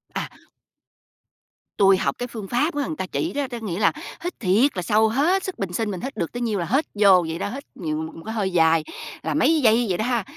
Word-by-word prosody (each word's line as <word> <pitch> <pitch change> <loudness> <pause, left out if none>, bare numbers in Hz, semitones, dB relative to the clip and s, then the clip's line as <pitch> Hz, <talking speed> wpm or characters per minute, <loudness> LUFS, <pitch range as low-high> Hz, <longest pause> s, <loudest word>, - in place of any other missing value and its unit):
À. - - -2 1.5
Tui 195 -1 +5
học - - -1
cái 245 - -4
phương 220 -5 -7
pháp 290 - 0
á, 290 -1 0
người 155 - -4
ta 190 - -2
chỉ 325 - -3
đó, 285 -1 -1
đó 240 - -4
nghĩa 190 -4 -3
là 210 - +4 0.3
hít 355 - -5
thiệt 220 +7 +3
là - - 0
sâu 215 +4 +3
hết 325 - +2
sức 375 - -6
bình 195 -3 -3
sinh 215 +2 -1
mình 185 - -5
hít 265 -2 -6
được 170 -5 -2
tới 245 - -5
nhiêu 220 -4 0
là 170 - -1
hết 270 - +1
vô 195 -4 +5
vậy 160 +1 -4
đó, - - -2
hít 275 +6 -6
nhiều 155 -4 -3
một 160 0 -7
một 165 - -10
cái 220 - -4
hơi 200 -4 -1
dài 165 -2 +4 0.4
là 160 - -1
mấy 305 - +3
giây 235 0 +4
vậy 180 - 0
đó 215 - -1
ha, 240 -3 0
215 Hz, 260 wpm, -23 LUFS, 180-250 Hz, 1.5 s, Tui